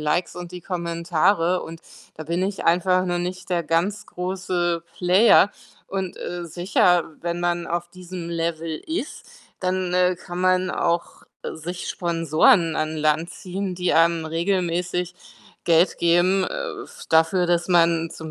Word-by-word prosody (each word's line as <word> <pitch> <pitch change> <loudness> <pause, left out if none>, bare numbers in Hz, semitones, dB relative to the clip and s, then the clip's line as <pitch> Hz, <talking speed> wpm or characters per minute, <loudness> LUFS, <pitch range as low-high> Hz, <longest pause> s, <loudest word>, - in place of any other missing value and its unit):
Likes 150 +4 0
und 175 -1 -8
die 180 0 -8
Kommentare 170 +1 0
und 165 0 -9 0.4
da 160 - -7
bin 170 +3 -1
ich 195 +1 -3
einfach 180 +2 +3
noch 175 -1 -1
nicht 185 +1 -5
der 175 -2 0
ganz 175 +6 -1
große 180 -2 -2 0.2
Player. 190 +3 +5 0.3
Und, 190 -2 -4
äh, 175 0 -5
sicher, 175 0 +2 0.2
wenn 170 0 -3
man 175 0 -1
auf 175 0 -2
diesem 180 -1 -8
Level 165 -1 -2
ist, 320 -1 -4 0.4
dann, 185 -1 -1
äh, 180 0 +3
kann 175 0 -7
man 185 0 +2
auch 170 0 -1 0.3
sich 175 +3 -6
Sponsoren 165 0 +2
an 155 0 -2
Land 155 +2 +1
ziehen, 190 0 -5
die 180 0 0
einem 165 0 +3
regelmäßig 180 +1 -1 0.5
Geld 170 +1 +3
geben, 175 +3 +3
äh, 470 -5 -5
f - - -13
dafür, 165 +3 +3
dass 175 0 +1
man 165 -2 +3
zum 160 -1 -8
175 Hz, 150 wpm, -23 LUFS, 170-185 Hz, 0.5 s, Player